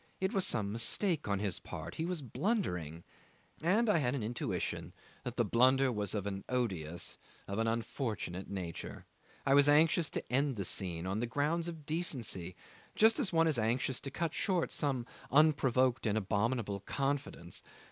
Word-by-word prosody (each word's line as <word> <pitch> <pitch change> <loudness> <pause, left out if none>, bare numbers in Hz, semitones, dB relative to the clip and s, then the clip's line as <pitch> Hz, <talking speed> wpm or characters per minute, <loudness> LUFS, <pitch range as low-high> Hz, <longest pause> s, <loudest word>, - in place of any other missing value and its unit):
It 190 +1 0
was 195 -2 +3
some 105 -4 +1
mistake 150 - +1
on 100 -1 +1
his 100 -2 -1
part; - - -7
he 160 - -2
was 175 -5 -2
blundering, 90 - -2 0.6
and 200 +9 +3
I 205 -6 +4
had 130 -2 +1
an 125 - -2
intuition 120 +3 -3 0.3
that - - -5
the - - +3
blunder 130 +2 +4
was 105 -3 -2
of 100 -2 -2
an 100 -1 -4
odious, 95 -10 -2 0.3
of 100 +2 -3
an 115 - +1
unfortunate 115 -5 -3
nature. 90 -4 -6 0.4
I 135 - +4
was 145 +1 +6
anxious 155 +1 +4
to - - -5
end 135 0 +2
this 100 -4 -2
scene 85 -3 -2
on 95 +3 -1
grounds 145 +8 0
of 160 -3 -7
decency, 120 - -2 0.4
just 220 +3 +5
as 235 -9 +1
one 165 -1 +4
is 150 -7 +2
anxious 120 +3 +1
to 135 - -5
cut 160 +3 -2
short 180 -4 0
some 135 -5 -1 0.2
unprovoked 130 -4 +3
and 105 0 +1
abominable 105 +1 0
confidence. 135 -6 -3
125 Hz, 165 wpm, -33 LUFS, 100-155 Hz, 0.6 s, was